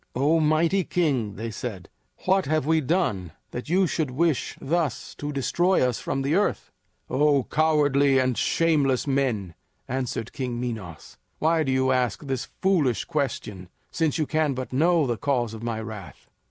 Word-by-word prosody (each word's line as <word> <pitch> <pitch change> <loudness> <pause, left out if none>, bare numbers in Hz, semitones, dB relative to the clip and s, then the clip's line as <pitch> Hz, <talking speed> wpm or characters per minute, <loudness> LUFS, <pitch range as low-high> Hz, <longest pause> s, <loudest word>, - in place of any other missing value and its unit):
"O 145 +6 +3
mighty 160 +5 +2
king," 135 - 0
they 115 +2 -5
said, 100 -4 -6 0.4
"what 190 -2 +2
have 155 -2 +1
we 160 +1 +3
done 125 - -1 0.2
that 125 +4 -6
you 185 +3 +3
should 160 -4 -1
wish 155 +2 0
thus 160 -3 -2
to 145 0 -5
destroy 150 +3 +2
us 125 - -2
from 135 0 -2
the 140 +3 0
earth?" 205 +4 0 0.4
"O 140 0 +3
cowardly 145 -2 +3
and 130 -1 +2
shameless 145 -5 +2
men," 125 - 0 0.3
answered 125 -3 -3
King 125 -5 -3
Minos, 110 -10 -6 0.2
"why 160 +1 +2
do 135 -4 0
you 130 0 +2
ask 125 -1 0
this 135 -3 -2 0.2
foolish 160 - +2
question, 110 - -3 0.2
since 160 -2 0
you 155 - +1
can 155 -2 0
but 130 0 -5
know 165 +3 +3
the 120 -3 -1
cause 125 -5 0
of 110 - -8
my 115 -1 -3
wrath? 110 -4 -9
135 Hz, 165 wpm, -25 LUFS, 120-155 Hz, 0.4 s, O